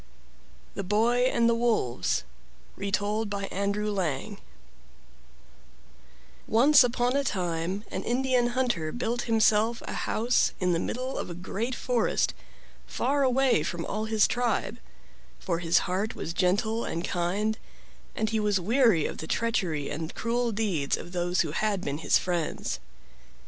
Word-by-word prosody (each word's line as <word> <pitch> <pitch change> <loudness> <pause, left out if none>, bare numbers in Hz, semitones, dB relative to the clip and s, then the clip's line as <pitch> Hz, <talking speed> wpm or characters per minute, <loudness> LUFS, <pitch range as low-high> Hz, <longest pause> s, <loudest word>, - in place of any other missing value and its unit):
THE - - -3
BOY 230 +6 +2
AND 235 0 +3
THE 235 - +4
WOLVES 220 - 0 0.5
Retold 205 +2 -1
by 200 -1 -3
Andrew 200 +2 -1
Lang 190 +1 -2 2.1
Once 265 +5 +6
upon 245 +1 +1
a 280 - +2
time 180 -3 -2
an - - -3
Indian 250 0 +1
hunter 175 -12 0
built 240 0 -2
himself 220 +1 +3
a - - -5
house 235 +3 +1
in 180 -1 +1
the 165 - +1
middle 255 +7 -3
of - - -4
a 175 - -6
great 215 +7 -3
forest, 245 -1 0 0.5
far 285 +1 0
away 260 - +3
from 170 +1 -3
all 215 +1 -3
his 220 -1 +3
tribe; 235 -2 -1 0.6
for 170 -2 -2
his 170 -1 +2
heart 195 +5 -2
was 165 - -5
gentle 205 +6 +1
and 170 +2 -3
kind 200 +5 -1 0.6
and 220 0 -1
he 220 - +1
was 210 -2 +1
weary 220 - +3
of - - -4
the 160 - -6
treachery 180 -11 -1
and 160 +2 -5
cruel 235 +1 0
deeds 195 -10 0
of 175 - -9
those 180 0 0
who 160 - -2
had 205 +3 0
been 145 -3 -3
his - - +3
friends. 175 -3 -2
210 Hz, 145 wpm, -27 LUFS, 175-235 Hz, 2.1 s, Once